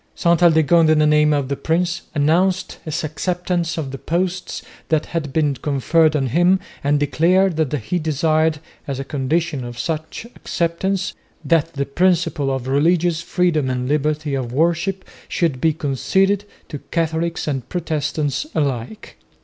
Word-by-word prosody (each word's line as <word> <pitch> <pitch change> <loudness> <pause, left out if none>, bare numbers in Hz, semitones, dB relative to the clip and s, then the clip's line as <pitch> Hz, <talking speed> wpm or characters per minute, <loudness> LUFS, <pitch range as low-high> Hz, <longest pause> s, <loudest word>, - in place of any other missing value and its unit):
Ste 170 - 0
Aldegonde 165 -1 +5
in 155 - +4
the 155 - +4
name 150 0 +4
of 145 -3 0
the 140 - -2
prince 170 +3 -1
announced 175 +6 +1
his 155 0 -3
acceptance 175 +2 -2
of 145 -4 -3
the 135 - -7
posts 180 +2 -2 0.3
that 155 -1 +1
had 160 -5 -4
been 150 -1 +1
conferred 150 +4 +2
on 140 -3 +1
him 175 +9 +3 0.2
and 145 +1 +2
declared 170 +5 +2
that 155 -4 0
he 150 +6 -2
desired, 155 0 +1 0.3
as 135 -2 -3
a - - -2
condition 145 +1 -1
of 120 0 -7
such 160 - -4
acceptance, 185 +3 -2 0.3
that 165 -3 +2
the 140 0 -2
principle 170 -1 +1
of 130 -1 -3
religious 165 +4 +2
freedom 170 -6 0
and 125 -1 -2
liberty 150 +1 0
of 130 -3 -2
worship 170 +6 0 0.2
should 160 -9 -1
be 160 - +4
conceded 190 +8 0 0.2
to 145 - -6
Catholics 165 0 -1
and 135 -4 -3
Protestants 155 - -2
alike. 140 - -3
155 Hz, 150 wpm, -20 LUFS, 145-170 Hz, 0.3 s, Aldegonde